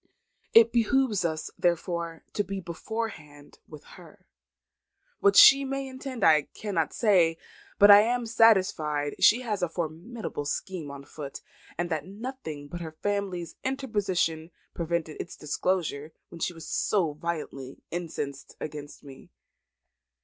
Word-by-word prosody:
It 230 0 +8
behoves 235 -3 +2
us, 160 -2 -2
therefore, 170 -2 -1
to 205 - 0
be 195 -1 -5
beforehand 170 -5 -7
with - - -12
her. - - -16 0.9
What 405 -1 +4
she 275 0 +9
may 275 0 -3
intend 260 -1 -6
I 155 -2 +5
cannot 190 -7 -1
say, 180 -7 +3 0.4
but 205 0 +8
I 205 0 +10
am 240 +2 0
satisfied 185 -10 +3
she 235 +4 +6
has 215 -5 -3
a 180 - 0
formidable 170 +2 -5
scheme 165 +1 -4
on 140 0 -9
foot, 140 -2 -8 0.4
and 175 +1 -2
that 155 0 -2
nothing 200 - -7
but 175 +4 -7
her 160 -1 -8
husband's 200 -4 -2
interposition 200 -11 -1 0.2
prevented 170 -2 -3
its 175 - -9
disclosure 155 -1 -2 0.2
when 170 - -11
she 180 - -1
was 165 -2 -11
so 175 -7 0
violently 150 -4 -6
incensed 155 -5 -5
against 150 -1 -8
me." 135 -2 -13
175 Hz, 135 wpm, -27 LUFS, 155-220 Hz, 0.9 s, I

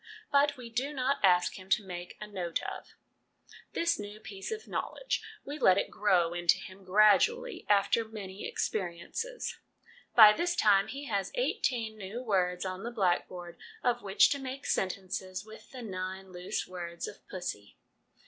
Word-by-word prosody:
But 285 0 +4
we 245 -2 -8
do 265 +5 -1
not 270 +2 +1
ask 180 0 +4
him 185 +1 -13
to 210 - +3
'make 175 -1 -7
a 210 - -5
note 185 -5 -3
of - - -7 0.8
this 335 0 +1
new 205 +1 -7
piece 195 - -7
of 440 0 -5
knowledge; - - -2 0.2
we 290 +2 -5
let 185 -7 +6
it - - 0
grow 180 -5 +2
into 175 -1 +3
him 190 +1 -11
gradually, 275 - +3
after 205 +3 +4
many 205 -3 -7
experiences. 210 - -3 0.6
By 215 -2 +10
this 350 +9 0
time 200 - +4
he 280 +2 -6
has 200 -6 -1
eighteen 235 - -1
new 210 +6 -5
words 180 -5 +1
on 185 0 -4
the 235 - -4
blackboard 180 -5 -1 0.2
of 245 -1 +2
which 195 0 +5
to 280 - 0
make 265 0 -6
sentences 185 0 -2
with 220 0 -13
the 255 -2 -8
nine 190 -1 -5
loose 180 0 -3
words 170 -2 -5
of - - -9
'pussy.' 140 - -6
205 Hz, 160 wpm, -31 LUFS, 185-250 Hz, 0.8 s, By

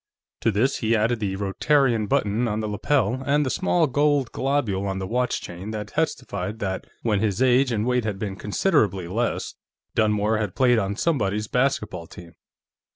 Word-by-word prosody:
To - - +1
this 115 +6 +1
he 115 0 +1
added 115 +2 +1
the 100 -3 -2
Rotarian 115 +3 +1
button 120 -3 +1
on 105 -1 -1
the 110 - -2
lapel, 120 +3 0
and 145 +2 +2
the 130 - -1
small 175 -3 +2
gold 145 -2 +1
globule 120 -9 -1
on 95 -1 -2
the 95 - -3
watch 125 +4 -1
chain 90 +4 -7
that 105 -2 -5
testified 105 +1 -2
that, 95 -3 -3 0.2
when 105 -4 +1
his 105 -1 0
age 130 0 +4
and 110 -1 0
weight 125 -1 +1
had 105 -3 -2
been 95 -1 -4
considerably 105 - +1
less, 115 +7 -2 0.4
Dunmore 105 0 +2
had 105 -4 -3
played 125 -3 +4
on 100 0 -2
somebody's 105 -8 0
basketball 105 -10 -1
team. 85 -1 -12
110 Hz, 175 wpm, -24 LUFS, 100-130 Hz, 0.4 s, age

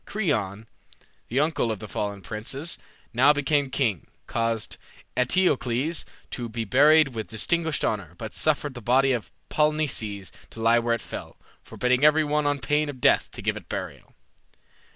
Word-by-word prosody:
Creon, 110 - -2 0.6
the 125 - 0
uncle 150 -6 +1
of 110 - -3
the 105 - -8
fallen 100 -1 -4
princes, 135 - -4 0.3
now 135 +5 +6
become 145 -1 +1
king, 115 - -1 0.2
caused 115 -2 -1 0.4
Eteocles 135 0 +1 0.3
to 120 -2 -4
be 115 0 -3
buried 145 +6 +6
with 110 -4 -5
distinguished 160 +8 0
honor, 95 -6 -2
but 110 +2 -7
suffered 145 -2 +1
the 120 - -8
body 130 +4 +3
of 115 -8 -2 0.2
Polynices 130 - 0 0.2
to - - -12
lie 115 +1 +4
where 115 0 +1
it 115 - -6
fell, - - -8 0.2
forbidding 125 +2 0
every 155 +1 +6
one 150 0 +1
on 145 0 +1
pain 150 +4 0
of 135 -3 -7
death - - +3
to - - -9
give - - 0
it - - -10
burial. - - -6
125 Hz, 160 wpm, -25 LUFS, 110-150 Hz, 0.6 s, now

